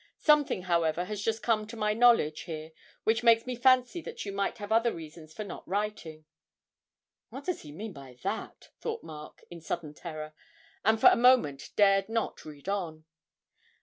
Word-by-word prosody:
Something, 295 Hz, -, +3 dB
however, 170 Hz, -1 st, +1 dB
has 205 Hz, +1 st, -5 dB
just 225 Hz, +1 st, -1 dB
come 215 Hz, -2 st, +1 dB
to 230 Hz, +1 st, -9 dB
my 210 Hz, -1 st, +1 dB
knowledge 230 Hz, -10 st, +4 dB
here 155 Hz, 0 st, -6 dB, 0.3 s
which 220 Hz, 0 st, +2 dB
makes 230 Hz, -1 st, +5 dB
me 255 Hz, -1 st, -3 dB
fancy 255 Hz, +5 st, +3 dB
that -, -, -7 dB
you 200 Hz, -, -4 dB
might 200 Hz, +3 st, -2 dB
have 205 Hz, -1 st, -7 dB
other 230 Hz, +1 st, +3 dB
reasons 160 Hz, -2 st, -10 dB
for 215 Hz, -, -6 dB
not 200 Hz, -, -8 dB
writing.' 190 Hz, -6 st, -3 dB, 1.0 s
('What 270 Hz, +3 st, -8 dB
does 365 Hz, -, -2 dB
he 150 Hz, -, -11 dB
mean 200 Hz, +6 st, -7 dB
by 135 Hz, -4 st, -12 dB
that?' -, -, -5 dB
thought -, -, -4 dB
Mark, 155 Hz, -2 st, -10 dB
in 170 Hz, -1 st, -9 dB
sudden 160 Hz, -2 st, -4 dB
terror, 155 Hz, -1 st, -7 dB, 0.5 s
and 220 Hz, +1 st, +3 dB
for -, -, +9 dB
a -, -, +4 dB
moment 235 Hz, -, +3 dB
dared 195 Hz, 0 st, +4 dB
not 225 Hz, 0 st, -2 dB
read 150 Hz, +1 st, -11 dB
on.) 170 Hz, -6 st, -3 dB
200 Hz, 180 wpm, -29 LUFS, 155-225 Hz, 1.0 s, for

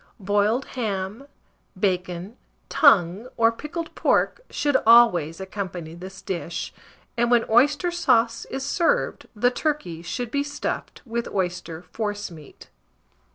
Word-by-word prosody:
Boiled 205 Hz, +5 st, +1 dB
ham, 215 Hz, +1 st, -3 dB, 0.5 s
bacon, 180 Hz, +1 st, -1 dB, 0.3 s
tongue, 205 Hz, -, +4 dB
or 230 Hz, -1 st, +5 dB
pickled 315 Hz, +7 st, -6 dB
pork, -, -, +1 dB
should 290 Hz, -2 st, 0 dB
always 215 Hz, -9 st, +5 dB
accompany 185 Hz, -4 st, -6 dB
this 185 Hz, +3 st, -10 dB
dish; 170 Hz, -2 st, -4 dB, 0.4 s
and 240 Hz, 0 st, +1 dB
when 240 Hz, -1 st, +4 dB
oyster 290 Hz, +9 st, +3 dB
sauce 240 Hz, -9 st, +2 dB
is 270 Hz, 0 st, -5 dB
served, 365 Hz, +9 st, 0 dB
the 245 Hz, +4 st, +3 dB
turkey 250 Hz, -, -2 dB
should 235 Hz, +7 st, -4 dB
be 280 Hz, -, +1 dB
stuffed 285 Hz, 0 st, -4 dB
with 235 Hz, 0 st, -3 dB
oyster 175 Hz, -3 st, -3 dB
forcemeat. 205 Hz, -9 st, -6 dB
220 Hz, 115 wpm, -24 LUFS, 180-255 Hz, 0.5 s, or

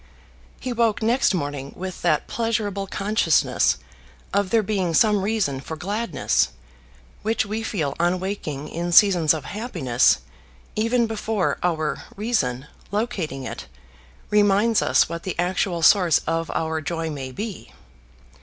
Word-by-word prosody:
He 255 Hz, -, -3 dB
woke 230 Hz, -2 st, +1 dB
next 245 Hz, +5 st, +3 dB
morning 145 Hz, -6 st, -3 dB
with 185 Hz, 0 st, -6 dB
that 155 Hz, -4 st, +2 dB
pleasurable 215 Hz, -4 st, -2 dB
consciousness 200 Hz, -5 st, +2 dB, 0.6 s
of 200 Hz, -1 st, +1 dB
there 225 Hz, +1 st, +3 dB
being 190 Hz, -5 st, -1 dB
some 210 Hz, 0 st, +4 dB
reason 195 Hz, -10 st, 0 dB
for 160 Hz, +4 st, -6 dB
gladness, 200 Hz, +2 st, 0 dB, 0.7 s
which 220 Hz, 0 st, 0 dB
we 215 Hz, +2 st, -3 dB
feel 165 Hz, -11 st, -2 dB
on 175 Hz, +2 st, +2 dB
waking 160 Hz, -7 st, -4 dB
in 175 Hz, +1 st, -3 dB
seasons 175 Hz, -6 st, +6 dB
of 155 Hz, -4 st, -1 dB
happiness, 175 Hz, -, +1 dB, 0.6 s
even 230 Hz, +2 st, +2 dB
before 220 Hz, -3 st, -1 dB
our 160 Hz, -3 st, -1 dB
reason, 170 Hz, -, -1 dB, 0.2 s
locating 195 Hz, -, -2 dB
it, -, -, -7 dB, 0.6 s
reminds 210 Hz, +2 st, +4 dB
us -, -, +3 dB
what 170 Hz, 0 st, -5 dB
the 185 Hz, -, -5 dB
actual 175 Hz, -1 st, 0 dB
source 180 Hz, -4 st, +6 dB
of 165 Hz, 0 st, -1 dB
our 160 Hz, 0 st, -1 dB
joy 165 Hz, 0 st, -3 dB
may 135 Hz, -3 st, -5 dB
be. 205 Hz, -, -6 dB
190 Hz, 135 wpm, -23 LUFS, 160-215 Hz, 0.7 s, seasons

